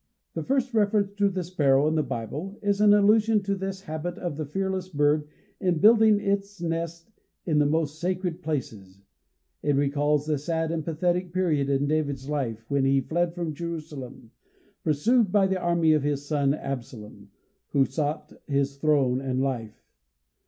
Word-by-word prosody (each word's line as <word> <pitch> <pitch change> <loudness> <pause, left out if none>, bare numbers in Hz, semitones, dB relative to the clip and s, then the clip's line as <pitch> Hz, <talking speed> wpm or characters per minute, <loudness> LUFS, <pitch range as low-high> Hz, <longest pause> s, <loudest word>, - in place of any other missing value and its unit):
The - - -3
first 260 -1 0
reference 205 -2 +2
to 200 -1 +3
the 185 -1 -3
sparrow 145 -5 +2
in 155 - +1
the 160 - +2
Bible 140 - -5
is 205 0 +1
an 210 -1 +6
allusion 210 +1 +4
to 200 0 -1
this 195 0 -4
habit 160 +1 -5
of 175 -5 -4
the 155 -1 -4
fearless 190 +2 -2
bird 150 -1 +1 0.3
in 180 -4 +1
building 215 +2 +6
its 200 -1 -2
nest 170 +3 -4 0.3
in 155 -4 +2
the 145 - +4
most 155 0 -1
sacred 180 0 -2
places. 105 -11 -5 0.6
It 145 -1 +1
recalls 145 +1 +1
the 150 -2 0
sad 160 +2 -1
and 165 -2 -2
pathetic 175 +3 -1
period 160 -7 +1
in 140 0 +1
David's 145 -3 -1
life, 120 -7 -3
when 140 -1 +1
he 135 0 +3
fled 170 +4 -1
from 170 -3 -3
Jerusalem 150 -7 -7 0.5
pursued 205 - +2
by 200 -1 +4
the 190 -1 -1
army 170 -2 +3
of 155 - +2
his 145 0 -2
son 145 -2 +1
Absalom, 125 -7 -7 0.4
"who 135 -1 +2
sought 145 +3 -3
his 140 -1 0
throne 140 -4 +2
and 130 -1 -2
life." 125 -5 -3
155 Hz, 165 wpm, -26 LUFS, 140-185 Hz, 0.6 s, an